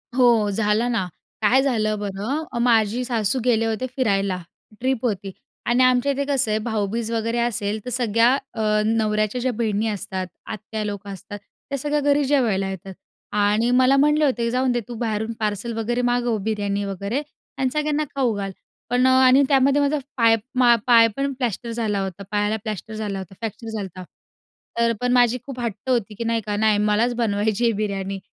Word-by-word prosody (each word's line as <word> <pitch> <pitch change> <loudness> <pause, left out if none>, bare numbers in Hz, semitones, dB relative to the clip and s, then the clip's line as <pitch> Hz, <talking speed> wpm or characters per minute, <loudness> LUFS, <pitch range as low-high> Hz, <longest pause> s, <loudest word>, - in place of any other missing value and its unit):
हो. 235 -5 +4
झालं 215 +3 +1
ना, 220 -6 0 0.4
काय 250 +6 +4
झालं 215 -6 0
बरं 225 +7 -3
माझी 230 0 +2
सासू 235 0 0
गेले 225 -2 +3
होते 225 +3 -1
फिरायला 200 -7 +1 0.4
ट्रिप 255 -1 -1
होती 200 -3 -2 0.3
आणि 245 +2 +3
आमच्या 255 +2 +3
इथे 280 +1 -1
कसं 270 -6 +1
आहे? 215 - +1
भाऊबीज 220 +1 -2
वगैरे 230 +1 -1
असेल 215 -3 -1
तर 250 - -4
सगळ्या 235 0 +3 0.2
अ, 215 -2 +1
नवऱ्याच्या 215 +1 0
ज्या 255 - +1
बहिणी 220 -1 0
असतात, 190 -3 -3 0.2
आत्या-लोक 210 -1 -5
असतात, 205 +1 -8
त्या 275 +6 -8
सगळ्या 295 +2 0
घरी 285 0 +3
जेवायला 225 -9 +1
येतात 190 0 -7 0.4
आणि 210 +3 +2
मला 255 +2 +5
म्हटले 300 +2 +4
होते, 235 -4 0
"जाऊन 255 +1 +1
दे, 240 - +1
तू 240 - -7
बाहेरून 220 -1 -1
पार्सल 215 +2 -2
वगैरे 240 +2 -1
मागव, 240 -2 +1
बिर्यानी 205 -2 -1
वगैरे 200 +7 -3 0.4
आणि 260 -1 +1
सगळ्यांना 300 0 0
खाऊ 255 -4 +1
घाल." 195 -1 -3 0.4
पण 250 +1 +2
आणि 260 +1 +6
त्यामध्ये 275 +1 +4
माझा 285 +2 +1 0.2
पाय 230 -2 +5 0.2
मा 240 -1 +6
पाय 230 -2 +7
पण 275 0 -1
प्लॅस्टर 240 -2 -3
झाला 220 -3 -1
होता. 190 +1 -6
पायाला 210 +1 +1
प्लॅस्टर 215 0 -5
झाला 210 -3 -3
होता. 190 0 -9
फ्रॅक्चर 225 +1 -6
झालता. 185 -2 -6 0.8
तर 230 0 +3
पण 250 - +1
माझी 245 0 +4
खूप 265 -3 -7
हट्ट 230 +1 -4
होती, 225 -4 0
की 230 - -4
नाही 230 -1 0
का 205 -1 -2
नाही 215 0 +3
मलाच 210 +4 +2
बनवायची 215 0 0
आहे 235 - +4
बिर्याणी 195 -2 -3
225 Hz, 175 wpm, -22 LUFS, 210-250 Hz, 0.8 s, पाय